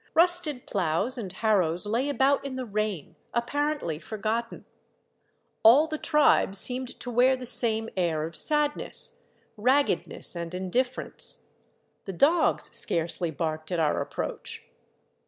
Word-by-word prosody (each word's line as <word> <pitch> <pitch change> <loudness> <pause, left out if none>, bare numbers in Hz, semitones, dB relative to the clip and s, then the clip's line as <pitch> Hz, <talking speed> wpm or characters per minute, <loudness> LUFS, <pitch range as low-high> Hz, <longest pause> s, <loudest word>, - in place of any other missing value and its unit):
Rusted 335 -5 +2
ploughs 190 +6 0
and 195 -5 -5
harrows 185 -5 +1
lay 235 +7 -1
about 280 0 +1
in 275 -2 -6
the 260 -1 -4
rain, 210 -6 -4 0.2
appar 290 +6 -1
ently 160 - -5
forgotten. 225 +2 -4 1.0
All 255 +8 +6
the 310 -1 -5
tribe 295 -9 +2
seemed 250 +5 +3
to 245 - -5
wear 250 +3 +3
the 255 -1 -8
same 225 -2 +3
air 170 -4 -1
of 165 +1 -6
sadness, 295 - +2 0.4
raggedness, 260 -2 0
and 170 +1 -6
indifference. 240 +8 -3 0.6
The 195 - -6
dogs 315 - +1
scarcely 170 +1 -1
barked 155 +1 -4
at 175 - -1
our 155 -2 +1
approach. - - -5
225 Hz, 130 wpm, -26 LUFS, 180-270 Hz, 1.0 s, All